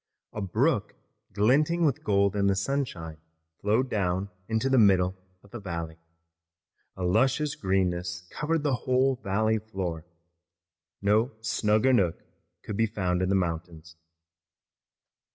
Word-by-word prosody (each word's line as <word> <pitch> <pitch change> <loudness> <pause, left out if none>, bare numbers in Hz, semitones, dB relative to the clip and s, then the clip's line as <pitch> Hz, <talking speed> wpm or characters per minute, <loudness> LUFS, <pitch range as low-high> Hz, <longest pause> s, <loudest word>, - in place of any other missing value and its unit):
A 105 - -4
brook 95 -3 0 0.4
glinting 145 - +2
with 140 -5 0
gold 100 -1 +2
in 100 -1 +2
the 100 - +3
sunshine 100 - -3 0.4
flowed 110 +6 +1
down 95 -3 -1 0.2
the 130 +4 +1
middle 95 -3 +4 0.3
of 100 - -20
the 120 - -6
valley. 85 -4 -5 1.0
A 95 - -4
luscious 130 +10 +2
greenness 90 -2 -1
covered 155 +1 -1
the 145 -3 +1 0.2
whole 130 +1 +3
valley 110 0 0
floor. 95 -7 -5 1.0
No 110 +6 +2
snugger 110 +3 +2
nook 90 -9 +1 0.4
could 105 - -5
be 115 - +3
found 90 -4 -1
in 95 - 0
the 100 - +2
mountains. 85 -2 -3
100 Hz, 125 wpm, -27 LUFS, 90-120 Hz, 1.0 s, middle